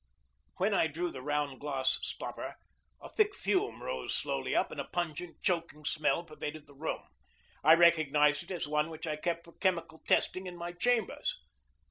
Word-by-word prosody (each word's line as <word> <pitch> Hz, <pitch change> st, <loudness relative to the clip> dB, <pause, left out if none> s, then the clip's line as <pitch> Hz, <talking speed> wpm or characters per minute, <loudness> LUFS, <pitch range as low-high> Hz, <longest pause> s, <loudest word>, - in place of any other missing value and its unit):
When 200 Hz, +3 st, +2 dB
I 175 Hz, -, +4 dB
drew 170 Hz, +3 st, -2 dB
the 130 Hz, -, -7 dB
round 145 Hz, -1 st, -1 dB
glass 135 Hz, -2 st, +1 dB
stopper, -, -, -5 dB, 0.5 s
a -, -, -6 dB
thick 420 Hz, -2 st, +2 dB
fume 395 Hz, +2 st, 0 dB
rose -, -, -2 dB
slowly -, -, -1 dB
up, -, -, +2 dB
and -, -, -3 dB
a -, -, -6 dB
pungent, 175 Hz, 0 st, -4 dB
choking 165 Hz, -4 st, -1 dB
smell 155 Hz, +3 st, +1 dB
pervaded 155 Hz, -2 st, -6 dB
the 145 Hz, -, -16 dB
room. 150 Hz, +4 st, -3 dB, 0.6 s
I 160 Hz, +3 st, +9 dB
recognized 155 Hz, -3 st, +5 dB
it 175 Hz, -, -12 dB
as 175 Hz, -5 st, -2 dB
one 150 Hz, +1 st, +1 dB
which 160 Hz, +1 st, -6 dB
I 155 Hz, -1 st, -1 dB
kept 170 Hz, +2 st, -2 dB
for 170 Hz, -, -15 dB
chemical 170 Hz, -4 st, -1 dB
testing 185 Hz, 0 st, +2 dB
in 175 Hz, -1 st, -7 dB
my 175 Hz, 0 st, -4 dB
chambers. 225 Hz, +4 st, 0 dB
165 Hz, 175 wpm, -32 LUFS, 150-180 Hz, 0.6 s, I